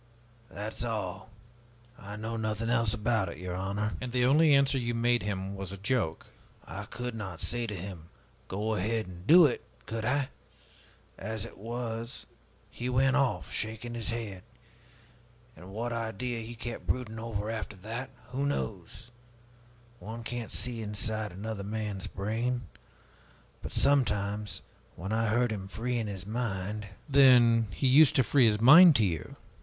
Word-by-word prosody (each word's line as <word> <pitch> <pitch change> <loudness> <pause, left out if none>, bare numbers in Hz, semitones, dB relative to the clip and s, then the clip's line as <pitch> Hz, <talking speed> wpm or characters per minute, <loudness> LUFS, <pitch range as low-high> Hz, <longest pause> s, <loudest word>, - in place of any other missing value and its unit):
That 105 +2 -6
is - - -1
all. 110 -3 -3 0.7
I 105 -2 -9
know 110 +2 -4
nothing 110 +1 -1
else 115 -3 +3
about 110 -4 +1
it, - - -8
your 90 -1 -5
honor!" 100 +3 -2
"And 125 -1 -4
the 125 0 +2
only 150 +4 +5
answer 140 -1 +4
you 120 -1 -1
made 120 +1 +2
him 100 -1 -3
was 95 -1 -6
a 100 - -6
joke?" 100 -5 -1 0.4
"I - - -6
could 125 0 -5
not 95 -6 -6
say 120 -1 -2
to 105 - -4
him, 90 -3 -8 0.4
'Go 105 +3 -1
ahead 110 +2 0
and 90 +1 -11
do 170 +1 +9
it,' 135 - 0 0.2
could 110 0 -4
I? 135 +3 +1 0.9
As 110 +1 -3
it - - -10
was 115 +1 -5 0.5
he 125 +1 -4
went 130 +2 +3
off, 140 -3 +1
shaking 110 +2 -3
his 115 -2 -2
head. 110 -5 -4 1.1
And 90 - -12
what 115 +4 -3
idea 115 +1 -3
he 115 +2 -7
kept 120 +1 -6
brooding 115 -3 -2
over, 110 -2 -3
after 110 -2 -5
that, 115 +7 -6 0.2
who 140 +2 0
knows? 110 -4 -4 0.9
One 115 +2 -7
can't 120 -1 -4
see 120 -2 -2
inside 110 0 -2
of 90 - -11
another 105 0 -4
man's 105 -2 -3
brain. 115 +5 -2 1.0
But - - -6
sometimes, 105 -6 +1 0.3
when 95 +5 -5
I 115 +1 +1
heard 120 +2 +2
him 95 -3 -4
freeing 115 +2 -2
his 95 -2 -5
mind 105 -2 -3
" - - -29
"Then 125 -5 +6
he 90 - -3
used 140 +3 +7
to 130 - +5
free 130 -1 +5
his 105 -1 +2
mind 160 +7 +9
to 110 - +4
you?" 80 -5 -3
110 Hz, 165 wpm, -30 LUFS, 105-120 Hz, 1.1 s, do